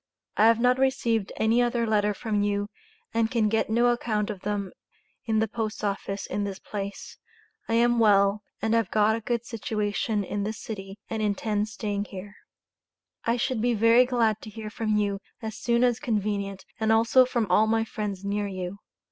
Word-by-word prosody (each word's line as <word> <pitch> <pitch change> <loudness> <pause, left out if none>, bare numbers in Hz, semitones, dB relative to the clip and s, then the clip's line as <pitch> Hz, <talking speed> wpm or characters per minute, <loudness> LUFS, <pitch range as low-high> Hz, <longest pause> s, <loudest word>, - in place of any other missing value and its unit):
I 215 - +5
have 230 0 +4
not 250 +1 +3
received 235 -6 +1
any 225 +2 +3
other 240 -1 +1
letter 210 -2 +1
from 210 -1 -1
you 205 0 0 0.4
and 225 -1 +2
can 225 -3 +1
get 225 0 +1
no 235 +2 +3
account 215 -3 0
of 200 - -7
them 200 -2 -2 0.5
in 220 -2 +1
the 220 +1 +2
Post 220 -1 -4
Office 200 -1 -2
in 205 - -2
this 200 -1 -4
place, 200 -1 -7 0.5
I 230 - +2
am 240 0 +3
well 200 -1 +4 0.2
and 220 0 +1
have 230 -1 +2
got 215 +1 +3
a 230 - -4
good 235 +1 -2
situation 210 -1 -2
in 205 +1 -3
this 215 +2 -3
city 195 -2 -7
and 220 -1 -3
intend 210 0 0
staying 205 -1 -3
here. 200 +1 -9 0.9
I 230 +1 +2
should 245 -1 -1
be 240 0 +2
very 230 +3 +5
glad 225 -4 +1
to 220 - -9
hear 215 0 -7
from 215 -1 0
you 200 -1 0 0.2
as 220 -2 -5
soon 235 0 +2
as 245 -2 +2
convenient 205 -5 -2
and 220 0 +2
also 230 +3 +5
from 245 -3 0
all 215 - +5
of - - -2
my 225 0 +2
friends 200 -3 -5
near 205 +1 -1
you. 185 0 -5
215 Hz, 190 wpm, -26 LUFS, 205-230 Hz, 0.9 s, I